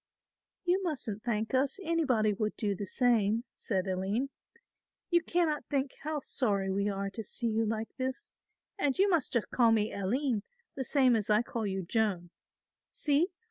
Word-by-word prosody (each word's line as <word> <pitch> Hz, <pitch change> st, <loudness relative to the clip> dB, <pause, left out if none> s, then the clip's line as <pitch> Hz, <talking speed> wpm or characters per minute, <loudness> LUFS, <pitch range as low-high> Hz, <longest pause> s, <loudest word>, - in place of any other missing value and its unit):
"You 360 Hz, +2 st, +2 dB
mustn't 255 Hz, -, -3 dB
thank 225 Hz, -1 st, -1 dB
us, 270 Hz, +7 st, +2 dB
anybody 265 Hz, -, +2 dB
would 210 Hz, +1 st, -2 dB
do 205 Hz, -2 st, 0 dB
the 200 Hz, +1 st, -5 dB
same," 230 Hz, -1 st, +2 dB
said 195 Hz, -3 st, -1 dB
Aline; 195 Hz, +8 st, -1 dB, 0.8 s
"you 345 Hz, 0 st, +5 dB
cannot 330 Hz, -3 st, 0 dB
think 275 Hz, -1 st, 0 dB
how 305 Hz, -1 st, -2 dB
sorry 200 Hz, -8 st, 0 dB
we 200 Hz, +2 st, +1 dB
are 195 Hz, 0 st, -2 dB
to 225 Hz, -, -5 dB
see 230 Hz, +3 st, -5 dB
you 220 Hz, 0 st, +1 dB
like 220 Hz, 0 st, -3 dB
this, 260 Hz, +9 st, -3 dB, 0.5 s
and 285 Hz, -7 st, +1 dB
you 390 Hz, -, +5 dB
must 340 Hz, -8 st, +2 dB
just 235 Hz, -4 st, -1 dB
call 235 Hz, -3 st, +4 dB
me 215 Hz, -1 st, +2 dB
Aline 225 Hz, +4 st, 0 dB, 0.3 s
the 265 Hz, -, -3 dB
same 260 Hz, -2 st, +4 dB
as 215 Hz, -2 st, -1 dB
I 210 Hz, +2 st, +4 dB
call 225 Hz, -2 st, -3 dB
you 190 Hz, -1 st, -2 dB
Joan. 185 Hz, -3 st, 0 dB, 0.6 s
See! 295 Hz, +3 st, +2 dB
230 Hz, 170 wpm, -31 LUFS, 205-275 Hz, 0.8 s, you